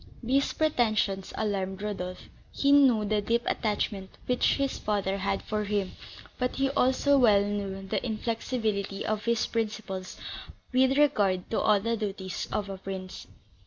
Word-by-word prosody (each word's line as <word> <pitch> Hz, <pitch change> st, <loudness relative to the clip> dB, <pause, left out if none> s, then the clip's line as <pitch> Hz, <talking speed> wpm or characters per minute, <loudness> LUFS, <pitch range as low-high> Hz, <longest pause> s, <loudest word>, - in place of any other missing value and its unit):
These 270 Hz, +4 st, +2 dB
pretensions 215 Hz, -10 st, +1 dB
alarmed 195 Hz, -2 st, -2 dB
Rodolph: 185 Hz, -3 st, -4 dB, 0.3 s
he 280 Hz, -, +2 dB
knew 260 Hz, -7 st, +6 dB
the 210 Hz, 0 st, +1 dB
deep 235 Hz, +3 st, +1 dB
attachment 205 Hz, -3 st, -1 dB, 0.2 s
which 250 Hz, -1 st, +2 dB
his 275 Hz, -1 st, -1 dB
father 200 Hz, -2 st, -1 dB
had 195 Hz, 0 st, -1 dB
for 215 Hz, -1 st, -2 dB
him, 200 Hz, -2 st, -1 dB, 0.5 s
but 250 Hz, 0 st, 0 dB
he 270 Hz, 0 st, +1 dB
also 275 Hz, +1 st, +3 dB
well 205 Hz, -5 st, +5 dB
knew 195 Hz, -1 st, -3 dB
the -, -, -1 dB
inflexibility 220 Hz, -3 st, -2 dB
of 215 Hz, -1 st, -2 dB
his 235 Hz, -1 st, +2 dB
principles 210 Hz, -5 st, -3 dB, 0.6 s
with 260 Hz, +1 st, +4 dB
regard 200 Hz, -11 st, +2 dB
to 225 Hz, -, +1 dB
all 210 Hz, -2 st, +4 dB
the 230 Hz, +3 st, 0 dB
duties 195 Hz, -3 st, -4 dB
of 205 Hz, -1 st, -1 dB
a 195 Hz, -1 st, -6 dB
prince. 190 Hz, -1 st, -7 dB
210 Hz, 150 wpm, -28 LUFS, 195-240 Hz, 0.6 s, knew